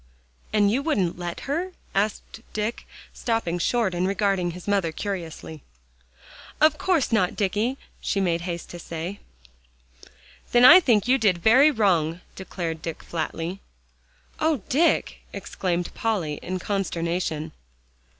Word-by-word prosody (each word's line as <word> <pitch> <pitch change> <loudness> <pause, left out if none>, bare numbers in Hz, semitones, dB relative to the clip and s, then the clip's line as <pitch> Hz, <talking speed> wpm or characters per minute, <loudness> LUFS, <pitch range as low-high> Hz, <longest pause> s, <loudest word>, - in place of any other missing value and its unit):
"And 205 -1 +3
you 255 +5 +1
wouldn't 195 - 0
let 175 -1 -5
her?" 340 +7 -3 0.2
asked 210 +2 -2
Dick, 215 +2 -3 0.3
stopping 225 -8 -1
short 225 0 +1
and 180 +1 0
regarding 195 -2 +1
his 175 +2 -9
mother 195 -5 +1
curiously. 165 -4 -6 1.0
"Of 305 0 +4
course 360 -10 +1
not, 190 -5 +2
Dicky," 210 +6 0 0.2
she 200 - -1
made 170 -3 +1
haste 170 -1 -5
to 175 - -8
say. 170 +4 -6 1.3
"Then 240 0 +7
I 350 +8 +11
think 235 - +2
you 265 +2 +4
did 200 -6 +3
very 245 - +6
wrong," 180 - +1
declared 170 -4 -5
Dick 165 -1 -6
flatly. 165 +2 -4 0.8
"Oh, 310 -9 +1
Dick!" 325 +6 +2
exclaimed 175 -2 -3
Polly 185 -10 -1
in 185 +1 -3
consternation. 170 -4 -2
195 Hz, 130 wpm, -25 LUFS, 170-230 Hz, 1.3 s, I